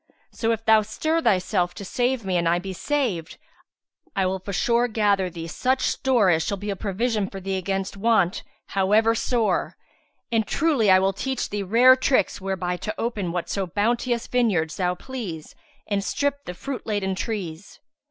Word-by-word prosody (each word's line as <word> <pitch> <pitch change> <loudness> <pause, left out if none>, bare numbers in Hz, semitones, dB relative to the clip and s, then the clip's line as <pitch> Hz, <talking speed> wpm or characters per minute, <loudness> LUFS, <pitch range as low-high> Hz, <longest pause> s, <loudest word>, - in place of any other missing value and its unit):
So 225 0 -1
if 225 0 -2
thou 220 -1 +6
stir 315 +10 -1
thyself 185 - +1
to 200 - -7
save 245 +2 -1
me 185 -1 -1
and 170 -1 +2
I 170 - +3
be 190 +2 -5
saved, 220 - -2 0.8
I 195 -2 +2
will 190 +1 -1
forsure 235 +6 +1
gather 205 -4 +1
thee 165 -1 -7
such 255 +10 0
store 240 -8 +2
as 160 -1 +2
shall 200 - -2
be 205 +2 -4
a - - -2
provision 210 +1 -1
for 195 - -7
thee 195 0 -3
against 195 +1 -2
want 200 -3 +2 0.3
however 210 +4 +3
sore; 230 -1 0 0.5
and 220 -2 +1
truly 285 -10 +2
I 185 - +8
will 190 +1 +2
teach 265 +6 -3
thee 205 0 -2
rare 235 +7 +6
tricks 260 -5 +1
whereby 185 -2 -2
to 215 +4 -5
open 210 -7 -2
whatso 180 +2 -2
bounteous 235 +5 0
vineyards 195 -11 +1
thou 180 -1 0
please 190 - -7 0.3
and 200 -1 -1
strip 285 +6 -1
the 180 - -6
fruit 270 +5 -6
laden 205 -3 -1
trees." 190 -4 -5
205 Hz, 170 wpm, -24 LUFS, 185-235 Hz, 0.8 s, I